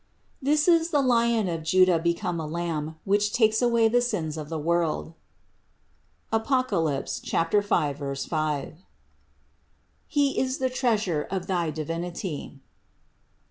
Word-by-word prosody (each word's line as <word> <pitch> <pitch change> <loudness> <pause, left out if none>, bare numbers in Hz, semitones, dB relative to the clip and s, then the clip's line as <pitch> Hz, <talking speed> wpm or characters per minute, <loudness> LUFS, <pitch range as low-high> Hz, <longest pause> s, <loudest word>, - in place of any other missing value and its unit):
This 295 +3 +2
is 335 -1 +4
the 295 - +2
Lion 235 -4 +2
of 165 -2 -3
Juda 180 +1 +4
become 170 +1 -1
a 155 - -4
Lamb, 160 -1 -3
which 205 +1 +2
takes 220 -1 +3
away 235 -2 +4
the 245 +2 +3
sins 175 -11 -2
of 150 -2 -6
the 165 - -3
world 165 0 -1 1.2
(Apoc. 255 +3 +1 1.0
5, 140 -5 -1 0.2
5). 150 -1 -3 1.3
He 285 -3 +1
is 260 0 0
the 260 -1 -1
treasure 215 - 0
of 185 -1 -3
thy 175 -3 0
Divinity." 165 0 -5
185 Hz, 120 wpm, -26 LUFS, 160-235 Hz, 1.3 s, is